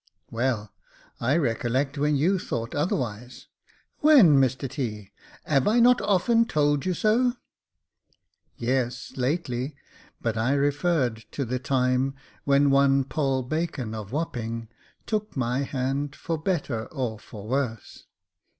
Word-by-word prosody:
" - - -52
Well, 115 -3 -1 0.5
I 130 +7 +2
recollect 130 0 0
when 150 +1 +1
you 180 +7 +2
thought 115 -8 -4
otherwise." 125 - -3 0.3
*' - - -37
When, 220 - +7
Mr 130 +1 0
T.? 110 -7 -5 0.3
'ave 140 +3 +2
I 230 +3 +3
not 245 +1 +5
often 210 +4 +3
told 145 -4 +1
you 180 - 0
so? 240 +6 +2 0.4
" - - -58 0.2
" - - -59 0.2
Yes, 125 0 -2
lately; 130 -1 -2 0.4
but 115 -1 -2
I 120 +5 +2
referred 140 - +1
to 140 - -2
the 125 +2 -2
time 130 0 +1 0.3
when 140 0 +4
one 140 0 +4
Poll 135 -1 -1
Bacon 140 -5 -3
of 110 -2 -7
Wapping 115 -7 -3 0.4
took 215 -6 -3
my 125 0 0
hand 140 +1 -2
for 165 - -3
better 150 - -2
or 125 -7 -4
for 105 -1 -11
worse." 125 -3 -3
135 Hz, 140 wpm, -26 LUFS, 120-155 Hz, 0.5 s, When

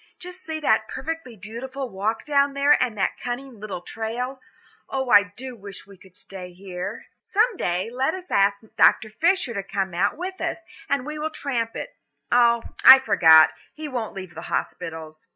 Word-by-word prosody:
Just 360 +1 -10
see 315 -1 -4
that - - +2
perfectly 325 -7 -6
beautiful 255 +7 -6
walk 215 +1 -3
down 280 -1 +2
there 280 +1 +5
and 235 -4 -1
that 195 - -1
cunning 245 -1 -5
little 200 -4 -6
trail. 240 +6 -5 0.5
Oh, 265 -2 -2
I 205 - +9 0.2
do 260 +2 -6
so - - -11
wish 200 -2 -10
we 200 0 -15
could 185 0 -20
stay 180 -2 -9
here." 180 -1 -7 0.2
"Some 450 +1 +1
day, 180 - -2
let 265 +6 0
us 370 -1 -9
ask 200 +1 +2
Dr. 215 - +4
Fisher 335 - +1
to 200 - -2
come 195 -1 -3
out 195 - 0
with 370 +2 -6
us, 330 0 -3 0.3
and 275 -2 0
we 300 +1 -6
will 310 +1 -2
tramp 240 -7 -3
it. - - -7 0.4
Oh, 235 -1 +4 0.2
I 265 - +12
forgot; 160 -11 +6 0.2
he 310 0 -6
won't 240 -7 -4
leave 185 -2 -8
the - - -8
hospitals." 160 -1 -5
240 Hz, 185 wpm, -24 LUFS, 195-280 Hz, 0.5 s, I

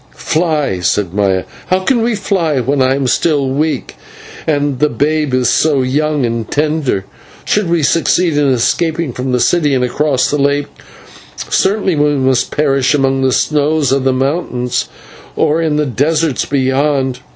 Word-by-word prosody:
"Fly!" 155 - -1
said 90 +1 -1
Maya, 95 -2 +1 0.2
"how 185 +1 +1
can 240 +4 +1
we 230 0 0
fly 170 -8 0
when 135 +2 0
I 130 +1 +2
am 140 -1 -2
still 140 +2 +1
weak 150 +4 -2 0.5
and 145 -4 0
the 150 - +2
babe 150 +3 0
is 130 -1 +1
so 145 -4 +2
young 145 +1 0
and 115 -1 -3
tender? 150 -9 -1 0.4
Should 205 -4 0
we 170 -2 +1
succeed 165 +2 +2
in 145 -1 +2
escaping 160 +4 0
from 125 +2 -3
the 125 - +1
city 150 -1 +2
and 125 - +1
across 130 +1 0
the 145 - 0
lake, 140 +1 +1 0.8
certainly 195 -2 +1
we 145 0 +2
must 130 -2 +1
perish 140 -2 +1
among 135 -1 +1
the 130 0 +2
snows 150 +1 +1
of 135 -1 +1
the 135 - +2
mountains 130 -2 -2 0.5
or 155 +2 +1
in 160 -2 0
the 150 0 +1
deserts 145 +3 0
beyond. 135 -1 0
145 Hz, 160 wpm, -14 LUFS, 130-155 Hz, 0.8 s, I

